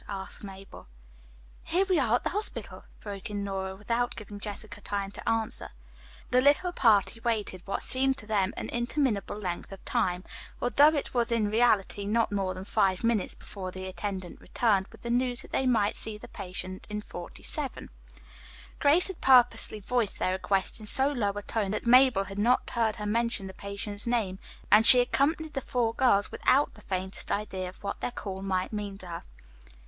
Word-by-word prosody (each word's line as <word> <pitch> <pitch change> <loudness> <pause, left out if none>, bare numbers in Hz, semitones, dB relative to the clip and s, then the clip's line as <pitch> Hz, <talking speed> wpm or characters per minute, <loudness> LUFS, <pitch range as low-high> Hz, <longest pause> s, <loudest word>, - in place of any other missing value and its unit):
asked 195 0 -5
Mabel. 195 - -11 0.8
"Here 370 +4 +1
we 370 -4 +3
are 240 -4 +3
at - - -1
the - - -1
hospital," 420 +3 -4 0.2
broke 200 +1 -7
in 205 -1 -3
Nora 190 -1 -3
without 230 +4 -1
giving 205 -1 -9
Jessica 205 0 -7
time 200 -1 -3
to - - -4
answer. 225 -1 -1 0.6
The 250 0 +5
little 290 +6 +3
party 230 - +3
waited 220 -6 -2
what 195 - -2
seemed 265 +1 +2
to 220 - -8
them 205 -3 +1
an - - -4
interminable 240 -4 -1
length 180 -4 -5
of 195 - -11
time; 180 0 0 0.4
although 280 +4 +5
it 285 - -3
was 240 -2 +1
in 215 -3 +1
reality 215 -3 +2
not 225 +1 +1
more 195 -2 -1
than 185 +1 -7
five 190 -1 +1
minutes 230 -4 +1
before 190 -2 -8
the 185 +1 -7
attendant 185 -1 -5
returned 200 -5 +1
with - - -17
the 235 - -3
news 245 0 +1
that - - -14
they 265 - +1
might 215 -4 +2
see 220 -1 -5
the - - -11
patient 185 -1 -6
in 210 0 -3
47. 285 +6 -3 0.9
Grace 305 +5 +5
had 380 -3 -7
purposely 245 -4 +5
voiced 225 0 -1
their 185 - 0
request 190 +2 -1
in 215 - -8
so 270 +4 +3
low 235 -8 0
a 205 0 -6
tone 210 -2 -2
that 210 - -3
Mabel 250 -4 +6
had 195 +1 -7
not 240 +4 +3
heard 225 -3 +1
her 210 -2 -6
mention 230 -1 0
the 190 - -7
patient's 200 +2 -6
name, 215 -6 0 0.3
and 215 +1 +8
she 250 - +12
accompanied 300 +5 +1
the 270 - -2
four 240 -3 0
girls 230 -5 +3
without 280 +3 +2
the 210 - -15
faintest 190 -1 -4
idea 190 -3 -2
of 185 - -16
what 200 - -4
their - - -1
call 195 -5 -6
might 190 +1 -2
mean 205 -2 -4
to 185 - -12
her. 170 -1 -6
210 Hz, 190 wpm, -28 LUFS, 195-245 Hz, 0.9 s, she